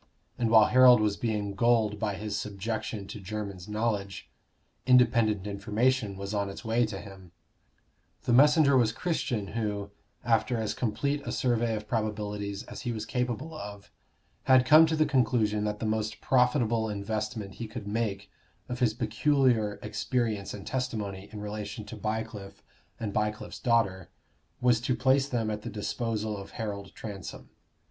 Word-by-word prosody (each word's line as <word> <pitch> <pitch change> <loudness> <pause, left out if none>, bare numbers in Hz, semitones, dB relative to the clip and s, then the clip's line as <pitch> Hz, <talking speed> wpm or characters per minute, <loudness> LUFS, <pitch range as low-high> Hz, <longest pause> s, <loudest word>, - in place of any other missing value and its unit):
And 115 -2 +1
while 110 -1 +7
Harold 125 -2 +7
was 105 -1 +1
being 105 -3 -2
gulled 110 -2 +2
by 105 -2 -1
his 105 +1 -4
subjection 105 +1 -4
to 100 - -8
Jermyn's 100 -2 -6
knowledge, 105 -3 -2 0.6
independent 115 -5 +4
information 105 +2 0
was 100 +1 -5
on 100 -1 -1
its 100 - -9
way 115 +1 +2
to 100 -3 -6
him. 95 -4 -12 0.9
The 120 - +1
messenger 145 +2 +6
was 120 -4 +4
Christian, 120 - -2
who, 105 -3 -3 0.3
after 120 +1 +2
as 110 -2 -1
complete 140 +5 -1
a - - -4
survey 120 -2 +1
of 105 0 -6
probabilities 105 -2 -3
as - - -9
he 120 - -2
was 110 -2 -4
capable 125 +6 -2
of, 105 -9 -9 0.5
had 130 -1 +6
come 155 +4 +8
to 160 - 0
the 155 0 +3
conclusion 115 -6 +1
that 105 0 -2
the 110 - -4
most 110 0 -1
profitable 120 -3 +2
investment 105 0 -3
he 115 - -3
could 110 -2 -7
make 100 -3 -2 0.4
of 125 0 -5
his 115 -4 +2
peculiar 120 -2 +2
experience 115 -6 -1
and 100 - -8
testimony 105 -7 -3
in 105 - -7
relation 105 0 -5
to 105 - -8
Bycliffe 110 -1 -5 0.4
and 105 -3 -3
Bycliffe's 105 0 -2
daughter, 100 -7 +1 0.5
was 120 -2 +3
to 120 +1 0
place 135 +3 +2
them 115 -4 -1
at 105 0 -4
the 115 - -6
disposal 110 0 -2
of 100 0 -10
Harold 100 -3 -4
Transome. 100 -3 -8
110 Hz, 155 wpm, -29 LUFS, 105-120 Hz, 0.9 s, come